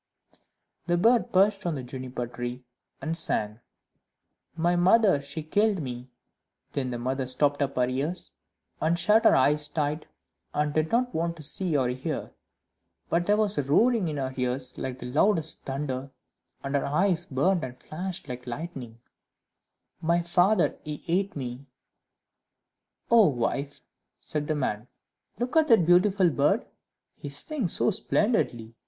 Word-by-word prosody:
The 175 0 +2
bird 230 +6 +3
perched 195 +2 +3
upon 175 -5 -2
the 130 - -5
Juniper 125 -1 -5
tree, 120 +1 -6 0.4
and 160 +1 -1
sang 105 -9 0 1.0
"My 170 +2 +1
mother, 185 -2 +4
she 140 +3 -6
killed 205 +5 +1
me;" 125 -3 -6 0.6
Then 135 -3 -2
the 120 - -3
mother 130 +2 -2
stopped 145 +2 +1
up 140 - -1
her 125 -1 +2
ears, 145 +8 -2 0.5
and 165 +2 +2
shut 210 +6 +3
her - - +7
eyes 145 +3 +3
tight, 150 0 -2 0.5
and 150 0 0
did 155 +1 0
not 245 +1 +1
want 170 +1 -1
to 155 - -10
see 160 +2 -1
or 130 -2 +1
hear; 130 +5 -4 0.8
but 170 +1 +1
there 205 +1 +4
was 210 -5 +1
a - - +3
roaring 210 - +3
in 150 -2 -3
her 130 -1 -3
ears 125 0 -2
like 130 -1 -5
the - - -8
loudest 160 +5 +1
thunder, 135 -1 -3 0.5
and 140 0 -4
her 140 - +1
eyes 175 +4 +1
burned 165 +6 +1
and 125 -1 -6
flashed 175 +4 -6
like 125 -1 -7
lightning 125 -3 -6 1.0
"My 170 +1 +1
father, 180 +3 +2
he 150 -1 -6
ate 190 +4 0
me;" 130 0 -6 1.4
"Oh, 225 -4 +7
wife," 140 +2 -2 0.4
said 150 -1 -4
the 155 - 0
man, 120 -5 -2 0.5
"look 245 +5 -3
at 320 -1 +5
that 220 - +5
beautiful 180 +1 +4
bird! 145 0 +2 0.5
he 145 - -8
sings 185 - -1
so - - +3
splendidly. 125 - 0
150 Hz, 150 wpm, -27 LUFS, 130-180 Hz, 1.4 s, her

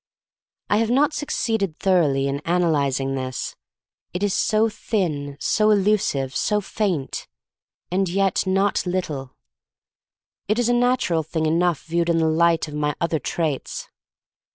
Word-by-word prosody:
I 205 - +2
have 225 0 +1
not 285 +5 +3
succeeded 220 - -1
thoroughly 150 -8 +2
in 140 +1 -2
analyzing 145 -6 +1
this 130 -1 -4 0.3
— - - -62
it 180 - -2
is 205 -2 +1
so 215 +1 +2
thin, 155 -11 -2
so 215 -1 +2
elusive, 195 -10 +1
so 210 -1 +1
faint 190 -8 -2 0.3
— - - -59
and 190 0 +1
yet 195 +1 +1
not 195 +2 +2
little. 150 -8 -3 1.1
It 215 +3 +1
is 245 -1 +2
a - - +3
nat 245 +1 +2
ural 165 -2 +1
thing 160 +1 -2
enough 170 0 +1
viewed 170 +1 -1
in 170 - +3
the 165 - +2
light 165 +1 +2
of 150 - -9
my 150 0 -1
other 170 -2 0
traits. 150 0 -3
170 Hz, 155 wpm, -23 LUFS, 150-205 Hz, 1.1 s, not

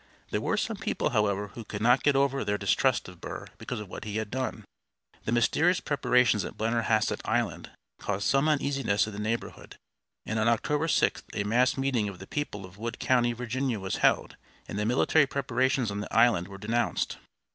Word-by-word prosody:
There - - 0
were - - 0
some - - -1
people, - - -1
however, 105 -1 +1
who 115 +3 -9
could 105 -1 -6
not 120 +3 +5
get 145 -1 +3
over 135 0 +2
their 105 0 0
distrust - - +1
of - - -13
Burr - - -6
because - - -5
of 105 - -7
what - - -8
he 105 -1 -5
had 110 -2 -3
done. 130 0 -3 0.6
The - - -1
mysterious 160 +10 +3
preparations 125 -6 +2
at - - -7
Blennerhassett 110 -1 +1
Island - - -1 0.3
caused 100 0 -2
some 140 +3 +3
uneasiness 135 -8 +1
in 110 - -7
the 100 - -6
neighborhood, 110 +2 -4 0.5
and 110 0 -2
on 110 - +2
October 150 +7 +1
6th - - +2
a 100 - 0
mass 120 +6 +2
meeting 130 -6 0
of 95 - -9
the 95 - -10
people 105 -7 -4
of 95 +2 -15
Wood 115 +1 -4
County, 120 -2 +2
Virginia, 125 0 -2
was 95 -1 -3
held, - - +2 0.3
and 105 - -4
the 105 - 0
military 140 +4 +3
preparations 130 -3 0
on 100 - -3
the 105 - -6
island 115 -6 +4
were 100 0 -9
denounced. 115 +4 -1
115 Hz, 195 wpm, -28 LUFS, 105-130 Hz, 0.6 s, not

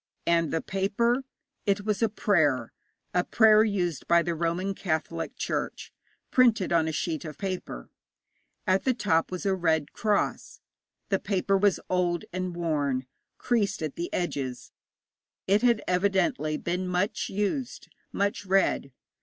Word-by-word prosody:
And 170 -2 +2
the 165 - -1
paper? 235 +7 0 0.4
It 200 0 +1
was 210 0 0
a 225 - +3
prayer 145 - +1 0.4
a 180 - +2
prayer 220 0 +5
used 180 -7 -1
by 170 0 +5
the 170 - -1
Roman 170 +4 -1
Catholic 165 -2 -3
Church, - - -3 0.4
printed 225 -8 +4
on 165 -1 +3
a - - 0
sheet 160 0 -2
of 155 -3 -8
paper. 190 -2 -5 0.7
At 190 -2 +2
the 260 -2 +2
top 165 -8 +1
was 185 +2 -5
a 195 - +2
red 160 -5 0
cross. 210 -2 -1 0.5
The 195 -2 +2
paper 195 0 0
was 195 -1 +3
old 175 -2 0
and 185 -1 -3
worn, 145 -6 -1 0.3
creased 210 -7 0
at 155 - -3
the 170 - -4
edges; 135 -8 -3 0.7
it 200 +2 +3
had 235 -3 +3
evidently 190 - +1
been 180 +3 -2
much 180 +3 -1
used, 210 +6 -2 0.2
much 200 +4 -1
read. 190 -7 +2
185 Hz, 145 wpm, -27 LUFS, 165-205 Hz, 0.7 s, prayer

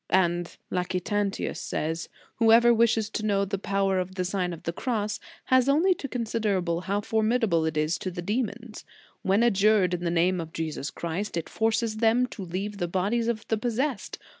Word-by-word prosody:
"J - - +6
And 175 -1 0
Lactantius 185 +3 -1
says: 160 +1 -3 0.3
"Whoever 230 +1 +6
wishes 225 -2 +3
to 215 - -3
know 200 -2 +2
the 195 0 -3
power 195 -1 +1
of 185 +1 -4
the 185 -1 -1
Sign 185 -1 -1
of 170 - -8
the 170 - -2
Cross, 215 -1 -2 0.2
has 260 0 +3
only 330 +7 +4
to 285 - -6
consider 225 -5 -1
how 180 +4 -1
formidable 220 -6 +1
it 160 -1 -2
is 155 +3 +1
to 185 - -3
the 175 -1 -6
demons. 220 +2 -3 0.4
When 195 +4 +2
adjured 205 -4 +4
in 175 0 -2
the 170 - 0
name 175 +1 +2
of 160 0 -8
Jesus 155 -3 -3
Christ, 170 +3 -4
it 165 - -3
forces 225 0 0
them 230 +3 +3
to 210 - -8
leave 195 +4 -4
the 175 - 0
bodies 200 +7 0
of 225 -2 -2
the 220 - +1
possessed. 245 +2 -2
200 Hz, 190 wpm, -27 LUFS, 180-225 Hz, 0.4 s, J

